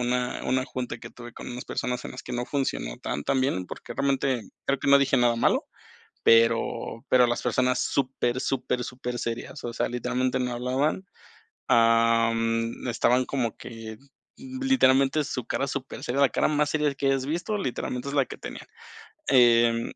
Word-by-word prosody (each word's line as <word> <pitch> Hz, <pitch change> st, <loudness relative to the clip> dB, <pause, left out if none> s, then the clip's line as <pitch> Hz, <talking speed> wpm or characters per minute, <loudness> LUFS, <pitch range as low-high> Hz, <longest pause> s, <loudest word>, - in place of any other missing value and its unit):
una 125 Hz, 0 st, -1 dB
una 130 Hz, 0 st, +1 dB
junta 125 Hz, -2 st, -5 dB
que -, -, -10 dB
tuve, 120 Hz, -1 st, -11 dB
con -, -, -9 dB
unas 125 Hz, +1 st, -7 dB
personas, 125 Hz, 0 st, -3 dB
en -, -, -8 dB
las -, -, -8 dB
que 125 Hz, -, -8 dB
no 120 Hz, +1 st, -2 dB
funcionó 130 Hz, -, -2 dB
tan, 75 Hz, -, -4 dB
tan 130 Hz, -, +1 dB
bien, 95 Hz, -9 st, -1 dB
porque -, -, -8 dB
realmente, 135 Hz, -3 st, 0 dB, 0.2 s
creo 140 Hz, -1 st, +1 dB
que 140 Hz, -, -2 dB
no 140 Hz, -, +8 dB
dije 140 Hz, -1 st, +2 dB
nada 120 Hz, -1 st, +3 dB
malo, -, -, +2 dB, 0.6 s
pero 115 Hz, 0 st, +2 dB
pero 125 Hz, -1 st, +5 dB
las 120 Hz, -, -1 dB
personas, 125 Hz, +1 st, +1 dB
súper, 130 Hz, -2 st, 0 dB
súper, 125 Hz, -2 st, -1 dB
súper 125 Hz, -1 st, -5 dB
serias, 115 Hz, 0 st, -5 dB
o 120 Hz, -, -4 dB
sea, -, -, -1 dB
literalmente 125 Hz, +1 st, -1 dB
no 125 Hz, -1 st, -1 dB
hablaban, 130 Hz, +9 st, -1 dB, 0.6 s
am, 115 Hz, 0 st, +2 dB
estaban 125 Hz, +2 st, +2 dB
como 125 Hz, -5 st, -2 dB
que 115 Hz, -2 st, -9 dB, 0.4 s
literalmente, 240 Hz, -, +2 dB
su 125 Hz, -4 st, -4 dB
cara 140 Hz, -, -1 dB
super 135 Hz, -1 st, -5 dB
seria, 125 Hz, +3 st, -2 dB
la 140 Hz, -, +6 dB
cara -, -, +1 dB
más 150 Hz, -1 st, +1 dB
seria 150 Hz, -2 st, +1 dB
que 140 Hz, -, -3 dB
hayas 135 Hz, -1 st, +1 dB
visto, 175 Hz, +8 st, -2 dB
literalmente 125 Hz, -7 st, -3 dB
es 140 Hz, -, -3 dB
la 140 Hz, -, +3 dB
que -, -, -9 dB
tenían. -, -, -8 dB, 0.6 s
Em, 120 Hz, -2 st, +4 dB
125 Hz, 175 wpm, -26 LUFS, 120-135 Hz, 0.6 s, no